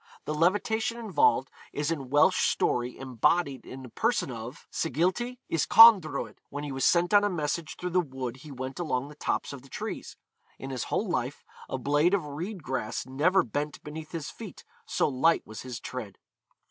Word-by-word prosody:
The 150 - -2
levitation 220 +8 +1
involved 190 - +2 0.2
is 145 +2 -1
in 140 -6 -4
Welsh 145 +2 +4
story 125 0 0
embodied 135 +3 0
in 130 0 -8
the 125 - -9
person 225 - 0
of 115 +3 -8
Sgilti 185 - 0
Yscawndroed; 165 - +6
when 145 - -5
he 145 - -4
was 135 0 -1
sent 175 +2 +3
on 205 0 +7
a 205 - +2
message 155 -2 -2
through 180 0 -4
the 180 - +3
wood 130 -6 -4
he 145 +3 -12
went 130 +3 -6
along 140 -5 -1
the 150 - -12
tops 145 - -2
of 140 - -8
the 135 - -17
trees; - - -6 0.4
in 135 - -7
his 130 - -3
whole 215 - -1
life, 130 -5 -2 0.3
a 130 - -2
blade 145 +8 +3
of 180 -6 -2
reed 170 +6 -6
grass 125 -5 -3
never 150 +9 +3
bent 145 +6 -4
beneath 155 +1 -8
his 165 -4 -5
feet, - - -10 0.2
so - - +1
light 150 +5 +2
was 110 - -8
his 125 -2 -6
tread. 110 -7 -7
145 Hz, 185 wpm, -28 LUFS, 130-175 Hz, 0.4 s, on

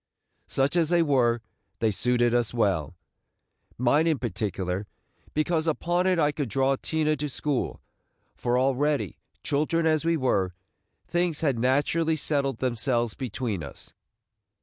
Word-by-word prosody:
Such 135 +4 +1
as 165 -3 +2
they 175 -1 +4
were, 120 -6 +2 0.4
they 110 -1 +1
suited 120 +3 +2
us 120 -1 +1
well, 95 - 0 0.4
– - - -51
mine 145 +7 +3
in 160 -3 +2
particular, 100 -5 -3 0.5
because 160 +1 +1
upon 175 +3 +1
it 185 -1 +3
I 150 -2 +3
could 145 -4 -3
draw 135 +4 +2
Tina 155 +2 0
to 150 +2 -3
school; 140 -1 -2 0.5
for 120 0 0
already, 135 - +1 0.2
children 155 +3 +1
as 155 -1 +2
we 165 0 +2
were, 95 - 0 0.5
things 175 -3 0
had 140 -7 +1
naturally 145 +6 +2
settled 140 -4 0
themselves 120 -2 0
between 120 - -3
us. 70 -3 -9
135 Hz, 140 wpm, -26 LUFS, 120-155 Hz, 0.5 s, they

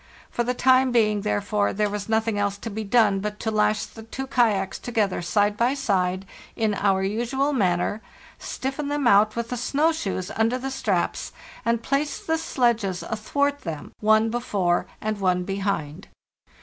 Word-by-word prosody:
For 240 - 0
the 250 +1 -1
time 260 0 +4
being, 215 -3 +2
therefore, 205 0 0
there 210 +1 +1
was 205 0 -5
nothing 220 -1 +1
else 205 0 0
to 225 +2 -6
be 220 +2 -4
done 205 -2 +3
but 210 +1 -4
to 220 - -1
lash 215 0 +2
the 225 - -12
two 240 +4 -6
kayaks 220 -7 +1
together 215 -7 -1
side 205 +4 +1
by 240 +5 +2
side 190 -7 0 0.3
in 220 -2 +1
our 195 -1 +1
usual 240 +8 0
manner, 190 -2 +1 0.4
stiffen 270 +2 -4
them 290 -1 -1
out 210 -1 +5
with 235 +1 -3
snow 290 +6 +2
shoes 195 - -3
under 225 +3 +2
the 270 +1 -4
straps, 205 -9 -1 0.3
and 230 0 0
place 280 +3 0
the 320 0 -1
sledges 235 - 0
athwart 280 +6 -1
them, 160 -4 -6
one 220 +1 +3
before 195 -7 0
and 215 -1 -2
one 180 -2 +1
behind. 195 -4 -3
215 Hz, 165 wpm, -24 LUFS, 200-245 Hz, 0.4 s, out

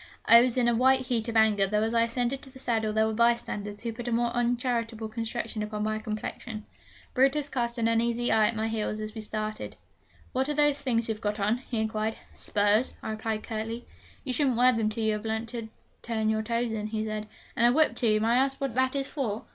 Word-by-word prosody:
I 230 0 +9
was 250 0 +1
in 245 -1 +3
a 240 - +3
white 260 +3 +4
heat 240 -3 -1
of 230 - 0
anger, 210 -3 +4
though 210 +2 +1
as 225 +1 -1
I 230 - +4
ascended 245 +3 0
to 270 - -9
the 260 - -14
saddle 225 -4 0
there 220 +1 +2
were 220 - -1
bystanders 210 -3 0
who 230 -1 -3
put 240 +1 -7
a - - -1
more 235 +1 +1
uncharitable 235 -2 -1
construction 225 0 -4
upon 210 0 -3
my 215 0 -1
complexion. 215 +1 -5 0.5
Brutus 275 +3 +2
cast 240 -2 -2
an 230 -1 +1
uneasy 235 +1 +1
eye 220 -1 +5
at 235 - -2
my 220 0 -1
heels 215 -1 -2
as 215 0 -5
we 220 - -6
started: 215 0 -4 0.6
'What 265 +2 0
are 295 - -1
those 295 -1 +3
things 235 -4 0
you've 220 -1 -3
got 210 0 -2
on?' 210 +4 +1
he 235 - -1
inquired. 220 0 -1 0.2
'Spurs,' 205 +4 +1
I - - -3
replied 215 0 -3
curtly. 225 +1 -4 0.4
'You 260 - -3
shouldn't 265 -4 +2
wear 250 +1 +6
them 225 -2 +1
till 220 +1 -3
you 220 0 +2
have 210 0 -4
learnt 220 +1 -2
to 230 -2 -5 0.3
turn 220 -2 0
your 220 0 0
toes 235 +1 -1
in,' 215 -1 -3
he 215 0 -2
said. 215 -1 -4 0.3
'And 240 -2 +4
a - - +5
whip, 310 +4 +3
too! 215 -3 +2
May 225 - +2
I 235 - +4
ask 270 +1 +1
what 275 -4 -2
that 260 +2 +1
is 275 -1 -1
for?' 230 -7 -3
230 Hz, 235 wpm, -28 LUFS, 215-245 Hz, 0.6 s, I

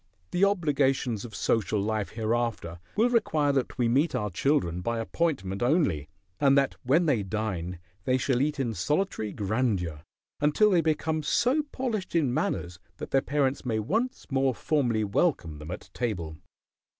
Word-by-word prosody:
The 185 +3 +4
obligations 135 - +1
of 110 -4 -9
social 110 -1 +1
life 105 0 -2
hereafter 110 -6 -2 0.2
will 235 +3 +3
require 155 -11 +2
that 135 -2 -1
we 120 -2 +2
meet 140 +7 +2
our 105 -1 -1
children 90 - +1
by 115 +5 -1
appointment 115 - -1
only, 120 - +1 0.3
and 140 -1 +5
that 135 -1 +3
when 155 +8 +3
they 135 -9 +2
dine 95 -4 -3 0.3
they 130 - +3
shall 130 -1 +1
eat 150 0 0
in 120 -4 0
solitary 145 - -1
grandeur 100 -8 -1 0.4
until 150 +9 +4
they 175 -3 +4
become 160 0 0
so 250 - +2
polished 220 -9 -3
in 145 -7 +2
manners 85 -7 -2 0.2
that - - -7
their 135 - +4
parents 140 -1 0
may 115 -3 -1
once 220 - -1
more 135 -2 +2
formally 120 -8 +1
welcome 100 - 0
them 75 +1 -9
at 95 +2 -7
table. 90 -10 -3
125 Hz, 160 wpm, -28 LUFS, 105-150 Hz, 0.4 s, and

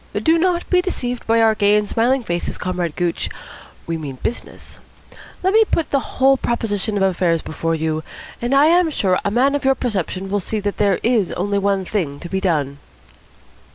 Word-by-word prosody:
Do 330 +1 +4
not 350 0 +1
be 360 -1 +3
deceived 250 -10 -4
by 225 0 +4
our 220 -1 +5
gay 205 -1 +3
and 210 0 +1
smiling 245 +4 +1
faces, 175 -4 -3
Comrade 180 -3 -3
Gooch. 175 -2 -1 0.6
We 165 -1 -3
mean 140 -4 -6
business. 240 - -6 0.6
Let 380 +1 +2
me 445 +1 +6
put 330 -7 -1
the 275 - +3 0.2
whole 270 +1 +5
position 215 -4 -1
of 195 - +1
affairs 175 -3 +1
before 165 +1 -2
you; 160 0 -2 0.4
and 240 +3 0
I 280 +2 +6
am 345 +1 +4
sure 190 -11 +1
a - - 0
man 255 +6 +2
of 285 - -1
your 270 0 +3
perception 195 -5 -3
will 205 - +1
see 215 +3 -2
that 205 0 -3
there 200 -3 +2
is 225 -6 +2
only 200 +2 -1
one 195 -1 0
thing 160 -9 -2
to 175 - -7
be 190 +1 -2
done." 145 -6 -1
205 Hz, 195 wpm, -20 LUFS, 180-260 Hz, 0.6 s, me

